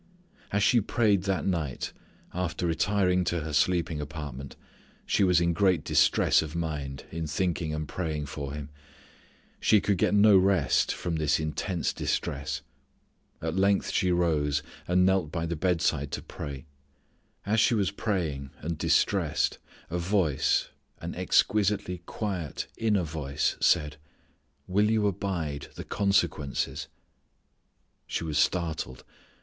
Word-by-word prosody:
As 100 0 +1
she 115 +4 +5
prayed 105 -3 +2
that 95 -2 0
night 80 -8 -2 0.4
after 90 -1 -2
retiring 90 +1 +2
to 85 -1 0
her 75 0 -5
sleeping 85 -1 +1
apartment 75 -3 -7 0.5
she - - +2
was 90 -3 +4
in 85 0 +2
great 90 -3 +2
distress - - +4
of 80 0 -6
mind 75 -5 -4
in 80 0 -3
thinking 85 0 -1
and 75 0 -3
praying 80 -3 -3
for 70 -1 -5
him. 75 0 -7 0.9
She 105 - +5
could 100 -2 0
get 105 - +3
no 105 0 +7
rest 90 -9 +2
from 85 -2 -3
this 75 -1 +2
intense 80 +3 -2
distress. 70 +2 -2 0.8
At 80 +1 -2
length 100 +1 +2
she 90 -2 +2
rose, 75 -4 +1 0.2
and 90 +1 +4
knelt 95 -5 +2
by 80 -2 -2
the 85 +1 -2
bedside 80 -4 0
to - - -3
pray. 70 -1 -7 0.8
As 110 +2 +2
she 115 +2 +4
was 100 -3 +1
praying 85 -10 -2
and 80 +1 -4
distressed - - +1 0.3
a 85 - -1
voice, 85 -6 +1 0.3
an - - -6
exquisitely 100 -3 +1
quiet 90 -9 -3
inner 105 -4 +1
voice 75 -4 -1
said, 75 0 +2 0.7
"will 105 +3 +2
you 110 -1 +2
abide 85 -8 -2
the - - -6
consequences?" 90 -8 0 1.2
She - - -2
was 75 -2 -1
startled. 80 -7 -1
85 Hz, 135 wpm, -28 LUFS, 75-95 Hz, 1.2 s, no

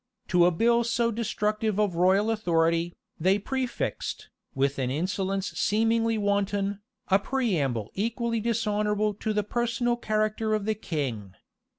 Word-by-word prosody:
To 175 -1 +5
a - - +3
bill 235 +7 +3
so 235 0 +1
destructive 215 -1 -1
of 205 -4 +2
royal 190 +5 +3
authority, 170 -4 +1 0.2
they 190 +5 +3
prefixed, 255 +4 -3 0.2
with 135 +1 0
an 130 -2 0
insolence 190 +6 -1
seemingly 225 +1 +1
wanton, 200 -1 0 0.3
a 195 0 +5
preamble 165 - -1
equally 230 +2 -1
dishonorable 210 -2 0
to 215 +2 -3
the 210 -1 +1
personal 240 +2 0
character 215 -1 0
of 210 -2 -2
the 220 - +1
king. 130 - -4
210 Hz, 130 wpm, -27 LUFS, 180-225 Hz, 0.3 s, To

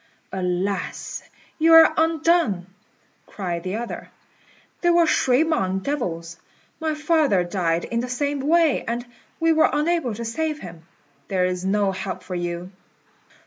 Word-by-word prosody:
"Alas! 185 +1 -2 0.4
you 325 +1 +5
are 325 -1 +8
undone," 320 - +2 0.6
cried 175 -4 -4
the 185 +3 -4
other; 235 +1 -6 0.7
"they 345 - +3
were 340 -1 +5
shui 265 -2 +3
mang 195 - 0
devils. 170 - -4 0.4
My 315 -1 -1
father 300 - +2
died 175 -2 -1
in 235 - -2
the 250 +1 -3
same 285 +3 -1
way, 315 +2 +3
and 235 +1 -2 0.3
we 330 0 +3
were 315 - +4
unable 300 -6 0
to 235 +2 -5
save 305 +6 -2
him. 165 -2 -11 0.4
There 185 -2 +1
is 180 0 -2
no 195 +1 +1
help 190 -1 -5
for 185 - -7
you." 175 +1 -4
230 Hz, 145 wpm, -23 LUFS, -, 0.7 s, are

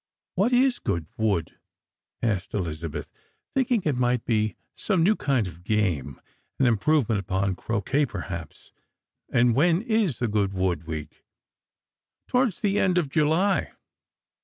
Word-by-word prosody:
" - - -66
What 200 +7 +2
is 255 0 +3
Goodwood? 100 - -2 0.3
" - - -65 0.3
asked 105 -5 -1
Elizabeth, 80 -5 -3 0.5
thinking 250 -6 +1
it 150 - +2
might 125 -1 +1
be 110 -4 +1 0.2
some 185 -6 +1
new 210 +5 +4
kind 130 - 0
of 85 0 -11
game 90 -11 0 0.2
— - - -46
an 135 - +4
improvement 120 -1 +2
upon 95 0 -1
croquet 115 +9 0
perhaps; 85 -5 -7 0.6
"and 120 0 +3
when 170 - +3
is 220 - +1
the 120 - 0
Goodwood 95 -5 0
week? 75 -2 -7 0.4
" - - -66
" - - -63
Towards 250 -6 +1
the 205 -1 +2
end 180 -1 +2
of 165 -6 +1
July." 165 +7 +2
115 Hz, 145 wpm, -26 LUFS, -, 0.6 s, new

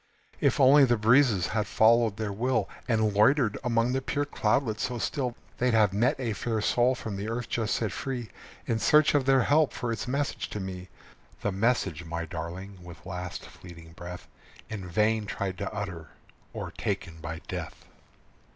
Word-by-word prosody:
If - - +2
only 140 +2 +7
the 120 -3 +3
breezes 110 -4 +4
had 105 -1 -1
followed 115 -1 +4
their 105 -2 -3
will, 115 -1 0 0.2
And 110 -3 +2
loitered 110 +2 +3
among 120 0 +1
the 135 - 0
pure 145 +2 -1
cloudlets 110 -4 0
so 125 -1 -2
still, 125 0 -2 0.2
They'd 125 -2 +2
have 105 -3 +4
met 115 +6 +2
a 120 -4 -1
fair 110 +3 -2
soul 120 +4 +2
from 110 -5 -5
the 100 +3 -4
earth 115 +1 -3
just 110 -3 0
set 110 -4 -1
free 120 -4 -4 0.3
In 115 - 0
search 150 +5 +5
of 145 -3 +2
their 135 -2 +5
help 150 +2 +3
for 120 -1 -3
its 115 0 -4
message 140 +3 -2
to 105 - -5
me; 95 -1 -6 0.5
The 100 - 0
message 95 -5 0
my 85 0 -4
darling, 85 +4 -7
with 85 -1 -12
last 90 0 -6
fleeting 85 -2 -13
breath, 90 +1 -9 0.4
In 95 -4 -5
vain 105 +3 +1
tried 95 -2 -3
to 100 - -3
utter, 95 -6 -5 0.5
o'ertaken 80 -1 -4
by 80 0 -6
death. - - -6
110 Hz, 175 wpm, -28 LUFS, 95-125 Hz, 0.5 s, only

